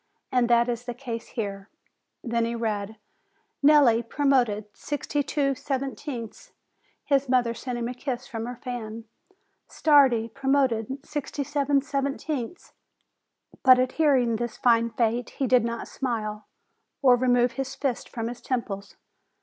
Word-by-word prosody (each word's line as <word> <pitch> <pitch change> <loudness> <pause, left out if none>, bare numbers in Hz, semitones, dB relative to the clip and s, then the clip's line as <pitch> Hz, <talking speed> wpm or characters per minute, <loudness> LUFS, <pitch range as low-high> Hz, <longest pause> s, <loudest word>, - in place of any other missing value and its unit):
And 250 -2 +2
that 235 0 +4
is 240 0 -3
the 245 -1 -5
case 235 -3 -6
here." 200 -3 -5 0.5
Then 235 -1 0
he 230 +1 -1
read: 220 -2 -3 0.7
"Nelli, 280 -6 +6
promoted, 240 -4 +1
sixty 290 0 -2
two 280 -1 0
seventieths." 265 -3 -5 0.6
His 275 -2 +2
mother 245 -2 +2
sent 245 +1 -5
him 235 -1 -2
a 250 - -4
kiss 250 0 -4
from 230 -3 -5
her 245 - -5
fan. 230 -2 -6 0.7
Stardi, 265 -7 +4
pro 275 -1 -3
moted, 255 -6 +2
with 270 +1 -6
sixty 290 -1 -4
seven 285 -1 +1
seventieths! 280 +1 -3 0.9
but, 255 -1 +8
at 255 0 +1
hearing 260 -7 +3
this 240 -1 -4
fine 230 -2 +3
fate, 230 +1 0
he 270 - +1
did 250 -1 +4
not 235 0 -3
smile, 215 -5 -3 0.6
or 255 -2 +7
remove 245 -1 +3
his 265 +2 -4
fists 265 -4 -2
from 230 -1 -4
his 240 +1 -7
temples. 205 -6 -4
245 Hz, 145 wpm, -26 LUFS, 230-275 Hz, 0.9 s, but